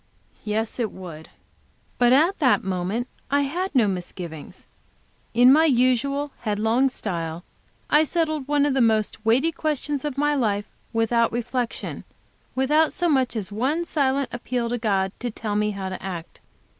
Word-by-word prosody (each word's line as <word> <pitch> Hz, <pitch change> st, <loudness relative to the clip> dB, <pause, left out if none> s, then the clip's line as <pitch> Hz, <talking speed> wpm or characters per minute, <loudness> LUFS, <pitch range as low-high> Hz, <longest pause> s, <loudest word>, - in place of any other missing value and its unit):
Yes, 220 Hz, +3 st, -2 dB
it 225 Hz, -4 st, -1 dB
would. 165 Hz, -4 st, -10 dB, 0.7 s
But 245 Hz, 0 st, +5 dB
at 320 Hz, +9 st, +4 dB
the 265 Hz, -6 st, +5 dB
moment 190 Hz, +6 st, -2 dB, 0.2 s
I 285 Hz, +1 st, +3 dB
had 345 Hz, +6 st, -2 dB
no 235 Hz, -5 st, +5 dB
misgivings. 175 Hz, -4 st, -6 dB, 0.7 s
In 250 Hz, +2 st, +7 dB
my 315 Hz, +2 st, +5 dB
usual 275 Hz, +1 st, +2 dB
headlong 225 Hz, +4 st, +1 dB
style 170 Hz, -8 st, -4 dB, 0.4 s
I 300 Hz, +1 st, +5 dB
settled 310 Hz, -3 st, -1 dB
one 290 Hz, 0 st, +3 dB
of 290 Hz, -, +1 dB
the 265 Hz, -, +2 dB
most 215 Hz, -2 st, +1 dB
weighty 255 Hz, +9 st, +3 dB
questions 295 Hz, -3 st, -2 dB
of 295 Hz, -3 st, -3 dB
my 295 Hz, +1 st, +2 dB
life, 210 Hz, -7 st, 0 dB, 0.3 s
without 230 Hz, 0 st, +2 dB
reflection, 245 Hz, 0 st, -3 dB, 0.5 s
without 300 Hz, +4 st, +3 dB
so 350 Hz, -1 st, 0 dB
much 260 Hz, -5 st, +2 dB
as 210 Hz, -2 st, -4 dB
one 270 Hz, +11 st, 0 dB
silent 275 Hz, -4 st, 0 dB
appeal 240 Hz, -1 st, -2 dB
to 245 Hz, 0 st, -2 dB
God, 195 Hz, -4 st, +1 dB
to 245 Hz, -, -3 dB
tell 215 Hz, -1 st, -4 dB
me 210 Hz, 0 st, +1 dB
how 195 Hz, -2 st, -4 dB
to 185 Hz, -, -6 dB
act. 175 Hz, -4 st, -7 dB
245 Hz, 155 wpm, -24 LUFS, 210-285 Hz, 0.7 s, In